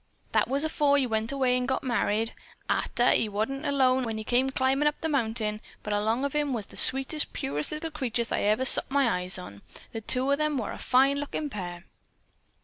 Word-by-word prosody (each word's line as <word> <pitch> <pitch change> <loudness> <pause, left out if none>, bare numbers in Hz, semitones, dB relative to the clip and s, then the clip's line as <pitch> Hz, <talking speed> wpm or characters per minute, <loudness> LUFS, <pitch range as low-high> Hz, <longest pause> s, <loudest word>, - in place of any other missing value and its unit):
That - - +2
was 275 +3 -1
afore 295 -2 +2
he 275 - +2
went 225 0 -1
away 260 -2 +1
an' 250 0 -1
got 265 - -1
married. 225 -3 0 0.3
'Arter - - 0
that 240 - +4
he 220 - -1
wa'n't 225 +8 -3
alone 260 -2 +2
when 225 -2 -3
he 220 - -5
come 250 +4 +1
climbin' 265 +2 +1
up 295 - -1
the 320 - -1
mountain, 220 -6 -1 0.2
but 210 - -3
along 220 +6 0
of 280 - -3
him 295 -2 0
was 220 -4 -3
the - - -16
sweetest 270 +3 +3
purtiest 145 +2 -3
little 315 +1 -5
creature 245 -6 -1
I'd - - 0
ever 215 +5 +2
sot - - +5
my 275 -1 +2
eyes 180 +1 0
on. 100 - -10 0.3
The 225 - -6
two 255 +5 +2
of 280 - +1
'em 305 -2 0
were 220 -5 -3
a - - -8
fine 270 +2 +3
lookin' 290 0 -4
pair." 175 -4 -6
255 Hz, 220 wpm, -27 LUFS, 220-280 Hz, 0.3 s, sot